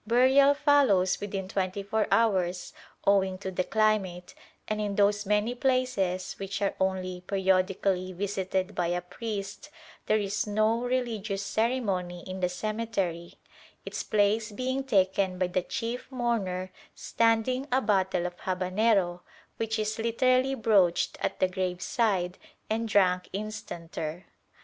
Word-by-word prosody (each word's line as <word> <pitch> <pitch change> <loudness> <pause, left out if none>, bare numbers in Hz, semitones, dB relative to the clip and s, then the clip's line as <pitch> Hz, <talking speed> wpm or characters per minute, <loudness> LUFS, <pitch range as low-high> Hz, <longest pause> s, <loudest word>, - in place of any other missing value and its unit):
Burial 265 +4 +5
follows 280 - +3
within 195 -2 -4
twenty 190 +1 -2
four 215 +2 0
hours 185 -6 +1 0.3
owing 190 -1 +3
to 190 0 -5
the 185 0 0
climate, 200 -5 0 0.3
and 215 0 -1
in 205 -1 -2
those 205 0 +2
many 210 +3 +2
places 250 -8 0
which 195 0 -4
are 200 - 0
only 185 -1 -1
periodically 190 -1 +1
visited 190 0 -2
by 175 - 0
a 175 +1 0
priest 200 +6 -6 0.4
there 215 - +4
is 205 +1 -1
no 215 +2 +2
religious 230 -5 -2
ceremony 195 -5 -1
in 185 0 -5
the 180 -1 +1
cemetery; 195 -4 -3 0.5
its - - -4
place 215 +1 +1
being 260 +5 -2
taken 190 -5 +1
by 185 - +1
the 180 +1 0
chief 245 +6 -4
mourner 200 -7 -1 0.2
"standing" 230 +4 +1
a 255 - +4
bottle 190 -6 +1
of 175 0 -4
habanero, 185 0 +1 0.4
which 225 0 -1
is 215 +1 -2
literally 255 +3 +2
broached 200 -8 +2
at - - -2
the 185 - +4
graveside 185 +1 -1 0.3
and 225 +1 -1
drunk 180 -3 +3
instanter. 175 -5 -5
200 Hz, 130 wpm, -28 LUFS, 185-225 Hz, 0.5 s, Burial